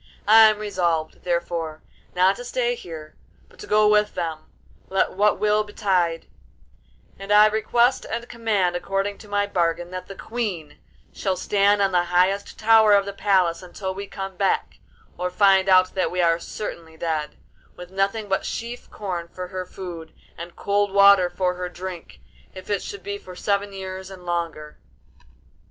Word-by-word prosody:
I 220 Hz, +1 st, +8 dB
am 215 Hz, -, -1 dB
resolved, 175 Hz, -6 st, -2 dB
therefore, 170 Hz, -2 st, -2 dB, 0.3 s
not 185 Hz, +2 st, +4 dB
to 245 Hz, -, -7 dB
stay 245 Hz, 0 st, -1 dB
here, 160 Hz, -9 st, -9 dB, 0.3 s
but -, -, -23 dB
to -, -, -9 dB
go 215 Hz, 0 st, +4 dB
with 210 Hz, 0 st, +3 dB
them, 160 Hz, -3 st, -4 dB, 0.4 s
let 195 Hz, -, +1 dB
what 205 Hz, +2 st, +2 dB
will 210 Hz, 0 st, +2 dB
betide; 185 Hz, -5 st, 0 dB, 0.9 s
and 195 Hz, +1 st, -6 dB
I 210 Hz, +1 st, +8 dB
request 225 Hz, +4 st, +2 dB
and 235 Hz, +1 st, -4 dB
command, 210 Hz, -7 st, 0 dB
according 195 Hz, +2 st, -2 dB
to 215 Hz, -, -13 dB
my 205 Hz, 0 st, 0 dB
bargain, 175 Hz, -2 st, -1 dB
that 185 Hz, 0 st, -6 dB
the 195 Hz, -, -9 dB
Queen 195 Hz, -12 st, -5 dB, 0.3 s
shall 190 Hz, -2 st, -2 dB
stand 205 Hz, +1 st, +2 dB
on 195 Hz, -, +2 dB
the 175 Hz, -1 st, +2 dB
highest 185 Hz, +3 st, +1 dB
tower 220 Hz, -1 st, +5 dB
of 200 Hz, -1 st, +3 dB
the 200 Hz, -, -5 dB
palace 190 Hz, -4 st, +1 dB
until 190 Hz, +1 st, -5 dB
we 200 Hz, +1 st, -7 dB
come 195 Hz, -1 st, -6 dB
back 195 Hz, -, 0 dB, 0.4 s
(or 180 Hz, 0 st, -1 dB
find 195 Hz, 0 st, +4 dB
out 185 Hz, 0 st, +5 dB
that 185 Hz, -3 st, 0 dB
we 180 Hz, +2 st, -4 dB
are 170 Hz, -1 st, +3 dB
certainly 165 Hz, -4 st, -7 dB
dead), 160 Hz, -2 st, -3 dB, 0.4 s
with 180 Hz, 0 st, -11 dB
nothing 200 Hz, +3 st, -1 dB
but 195 Hz, -1 st, 0 dB
sheaf 235 Hz, +1 st, -6 dB
corn 180 Hz, -5 st, -5 dB
for 180 Hz, +1 st, -8 dB
her 185 Hz, -1 st, -5 dB
food 170 Hz, -4 st, -8 dB, 0.2 s
and 170 Hz, +1 st, -9 dB
cold 205 Hz, 0 st, 0 dB
water 200 Hz, -2 st, +6 dB
for 180 Hz, 0 st, -1 dB
her 180 Hz, 0 st, -5 dB
drink, 175 Hz, -, -8 dB, 0.3 s
if 185 Hz, +2 st, -8 dB
it 200 Hz, -, 0 dB
should 200 Hz, -, -8 dB
be 200 Hz, 0 st, -5 dB
for 185 Hz, -2 st, -12 dB
seven 200 Hz, +2 st, -1 dB
years 190 Hz, -1 st, -7 dB
and 185 Hz, -2 st, -12 dB
longer. 165 Hz, -3 st, -4 dB
190 Hz, 170 wpm, -23 LUFS, 175-205 Hz, 0.9 s, I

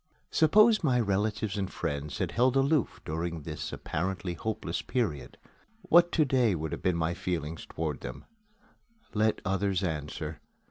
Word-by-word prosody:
Suppose 215 Hz, +7 st, +5 dB
my 130 Hz, -5 st, +3 dB
relatives 105 Hz, -1 st, 0 dB
and 95 Hz, -1 st, -2 dB
friends 75 Hz, -3 st, -3 dB
had -, -, -1 dB
held 125 Hz, +2 st, +3 dB
aloof 135 Hz, 0 st, +2 dB
during 80 Hz, 0 st, -3 dB
this 75 Hz, 0 st, -5 dB
apparently 90 Hz, +2 st, -3 dB
hopeless 90 Hz, -2 st, -3 dB
period, 105 Hz, -, -2 dB, 0.5 s
what 175 Hz, +1 st, +5 dB
to 155 Hz, -, +4 dB
day 125 Hz, -7 st, +3 dB
would 80 Hz, -1 st, -4 dB
be 95 Hz, -, +2 dB
my 85 Hz, -1 st, 0 dB
feelings 80 Hz, -3 st, -4 dB
toward 80 Hz, -3 st, -3 dB
them? 65 Hz, -, -7 dB, 0.9 s
Let 110 Hz, 0 st, +2 dB
others 95 Hz, -1 st, 0 dB
answer. 75 Hz, -2 st, -3 dB
95 Hz, 140 wpm, -29 LUFS, 80-120 Hz, 0.9 s, Suppose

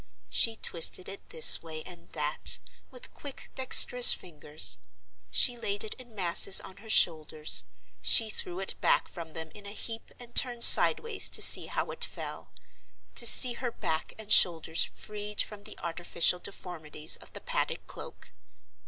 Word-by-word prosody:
She 225 Hz, -1 st, 0 dB
twisted 175 Hz, -2 st, 0 dB
it 195 Hz, -, -13 dB
this 160 Hz, -, +5 dB
way 155 Hz, -1 st, -11 dB
and 175 Hz, -2 st, -16 dB
that, -, -, 0 dB, 0.3 s
with -, -, -14 dB
quick, 285 Hz, -2 st, -13 dB
dexterous 250 Hz, -1 st, +7 dB
fingers; 150 Hz, -, -3 dB, 0.5 s
she 245 Hz, -, 0 dB
laid 205 Hz, -2 st, -4 dB
it 220 Hz, -, -5 dB
in 245 Hz, -4 st, -18 dB
masses 190 Hz, 0 st, +3 dB
on 190 Hz, -, -15 dB
her 220 Hz, +2 st, -17 dB
shoulders; 155 Hz, -, -1 dB, 0.4 s
she 215 Hz, -, +1 dB
threw 180 Hz, -2 st, -7 dB
it 195 Hz, -, -5 dB
back -, -, -1 dB
from 165 Hz, -3 st, -12 dB
them 160 Hz, -1 st, -9 dB
in 205 Hz, -1 st, -15 dB
a 200 Hz, -, -10 dB
heap 225 Hz, +1 st, -8 dB
and 240 Hz, -1 st, -15 dB
turned 240 Hz, -2 st, +1 dB
sidewise 455 Hz, -4 st, +4 dB
to -, -, -2 dB
see -, -, +4 dB
how -, -, -6 dB
it -, -, -8 dB
fell—to 235 Hz, -, -9 dB
see 245 Hz, +2 st, +8 dB
her 245 Hz, 0 st, -8 dB
back 160 Hz, -7 st, -7 dB
and 215 Hz, -1 st, -11 dB
shoulders 165 Hz, -2 st, +2 dB
freed 210 Hz, 0 st, -11 dB
from 205 Hz, -1 st, -6 dB
the -, -, -13 dB
artificial 170 Hz, +1 st, -2 dB
deformities 160 Hz, -5 st, -5 dB
of -, -, -19 dB
the -, -, -11 dB
padded -, -, -6 dB
cloak. -, -, -14 dB
190 Hz, 160 wpm, -26 LUFS, 160-225 Hz, 0.5 s, see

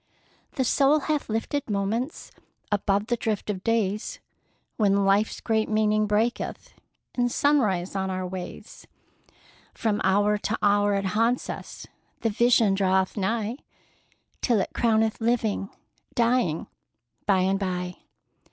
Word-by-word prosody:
The 265 Hz, -, 0 dB
soul 280 Hz, +4 st, +3 dB
hath 300 Hz, -3 st, -1 dB
lifted 225 Hz, +5 st, -2 dB
moments 215 Hz, +8 st, -2 dB, 0.4 s
Above 200 Hz, 0 st, +1 dB
the 240 Hz, +1 st, 0 dB
drift 215 Hz, -2 st, -2 dB
of 190 Hz, -2 st, -6 dB
days, 225 Hz, -, -1 dB, 0.6 s
When 200 Hz, -2 st, +2 dB
life's 200 Hz, +2 st, +2 dB
great 220 Hz, -1 st, 0 dB
meaning 215 Hz, 0 st, +2 dB
breaketh 220 Hz, +3 st, -1 dB, 0.4 s
In 245 Hz, -1 st, +1 dB
sunrise 220 Hz, -, +1 dB
on 190 Hz, 0 st, -1 dB
our 185 Hz, 0 st, -2 dB
ways; 180 Hz, -1 st, -8 dB, 0.9 s
From 215 Hz, -2 st, 0 dB
hour 205 Hz, +2 st, +3 dB
to 220 Hz, +2 st, -2 dB
hour 205 Hz, 0 st, +3 dB
it 195 Hz, 0 st, -1 dB
haunts 230 Hz, +6 st, +1 dB
us, -, -, -8 dB, 0.4 s
The 225 Hz, -, +1 dB
vision 230 Hz, -2 st, +4 dB
draweth 190 Hz, -1 st, +1 dB
nigh, 220 Hz, +3 st, -1 dB, 0.8 s
Till 235 Hz, -4 st, +2 dB
it -, -, -2 dB
crowneth 220 Hz, -1 st, +1 dB
living, 225 Hz, -4 st, 0 dB, 0.5 s
dying, 235 Hz, -9 st, +1 dB, 0.6 s
by 195 Hz, -2 st, +4 dB
and 190 Hz, +1 st, +1 dB
by! 180 Hz, -2 st, -3 dB
210 Hz, 125 wpm, -26 LUFS, 195-230 Hz, 0.9 s, vision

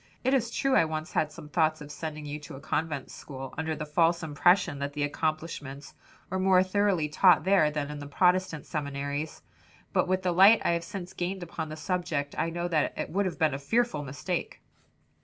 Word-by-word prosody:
It 260 Hz, +2 st, +2 dB
is 240 Hz, -4 st, +2 dB
true 270 Hz, +3 st, +1 dB
I -, -, +6 dB
once 155 Hz, +1 st, -4 dB
had 155 Hz, -, 0 dB
some 150 Hz, -, -11 dB
thoughts 155 Hz, 0 st, +1 dB
of 150 Hz, 0 st, -9 dB
sending 155 Hz, 0 st, -6 dB
you 145 Hz, +1 st, -5 dB
to 150 Hz, -1 st, -10 dB
a -, -, -9 dB
convent 155 Hz, -1 st, -3 dB
school, 135 Hz, -2 st, -8 dB
under 160 Hz, +1 st, -2 dB
the 150 Hz, -, -5 dB
false 165 Hz, +3 st, +2 dB
impression 160 Hz, +1 st, +2 dB
that 140 Hz, 0 st, -3 dB
the 145 Hz, 0 st, -1 dB
accomplishments 145 Hz, -2 st, -3 dB, 0.4 s
were 190 Hz, -, -1 dB
more 185 Hz, -1 st, +5 dB
thoroughly 190 Hz, -4 st, +1 dB
taught 180 Hz, +5 st, +5 dB
there 190 Hz, -5 st, +4 dB
than 150 Hz, -1 st, -3 dB
in 150 Hz, -, -6 dB
the 145 Hz, -, -7 dB
Protestant 180 Hz, 0 st, +1 dB
seminaries; 145 Hz, 0 st, -4 dB, 0.5 s
but -, -, +2 dB
with 185 Hz, +1 st, 0 dB
the 180 Hz, -, +1 dB
light 195 Hz, +6 st, +7 dB
I -, -, +3 dB
have 170 Hz, 0 st, 0 dB
since 185 Hz, -1 st, -7 dB
gained 180 Hz, +1 st, -3 dB
upon 160 Hz, -2 st, -5 dB
the 155 Hz, -, -7 dB
subject, 155 Hz, -4 st, -2 dB
I 165 Hz, -, 0 dB
know 170 Hz, +1 st, -2 dB
that 160 Hz, -4 st, 0 dB
it -, -, -4 dB
would 195 Hz, +3 st, +1 dB
have 180 Hz, -, -5 dB
been 155 Hz, -4 st, +2 dB
a 135 Hz, -, -3 dB
fearful 225 Hz, +2 st, 0 dB
mistake." 145 Hz, +6 st, -4 dB
160 Hz, 210 wpm, -28 LUFS, 150-180 Hz, 0.5 s, light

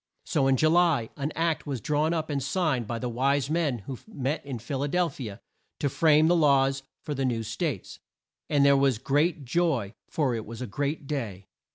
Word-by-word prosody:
So 135 Hz, -, +1 dB
in 135 Hz, -1 st, +3 dB
Ju 155 Hz, -, +3 dB
ly 165 Hz, -8 st, +3 dB
an 145 Hz, +2 st, -3 dB
Act 165 Hz, -1 st, 0 dB
was 135 Hz, -4 st, -2 dB
drawn 150 Hz, +7 st, +1 dB
up 160 Hz, -2 st, -2 dB
and 140 Hz, -1 st, -1 dB
signed 145 Hz, -, 0 dB
by 115 Hz, -, -3 dB
the 125 Hz, -, -3 dB
wise 135 Hz, +4 st, +1 dB
men 150 Hz, -10 st, 0 dB
who 130 Hz, -3 st, -6 dB
met 145 Hz, -, -3 dB
in 135 Hz, -3 st, -5 dB
Phil 130 Hz, +4 st, -4 dB
a 145 Hz, -, 0 dB
del 175 Hz, +3 st, +1 dB
phi 130 Hz, -7 st, -7 dB
a 100 Hz, +2 st, -10 dB, 0.4 s
to 145 Hz, -, 0 dB
frame 155 Hz, +1 st, +4 dB
the 175 Hz, -, +4 dB
laws 135 Hz, -4 st, +3 dB, 0.2 s
for 150 Hz, -, -3 dB
the 135 Hz, -1 st, -2 dB
new 120 Hz, -3 st, 0 dB
States, 135 Hz, -, -4 dB, 0.5 s
and 145 Hz, -2 st, +4 dB
there 140 Hz, 0 st, +6 dB
was 135 Hz, -3 st, +3 dB
great 145 Hz, +4 st, +1 dB
joy, 135 Hz, -, 0 dB
for 140 Hz, -6 st, 0 dB
it 110 Hz, -2 st, -4 dB
was 115 Hz, 0 st, -8 dB
a 125 Hz, -, -3 dB
great 140 Hz, +7 st, -3 dB
day. 110 Hz, -10 st, -4 dB
140 Hz, 215 wpm, -27 LUFS, 125-155 Hz, 0.5 s, there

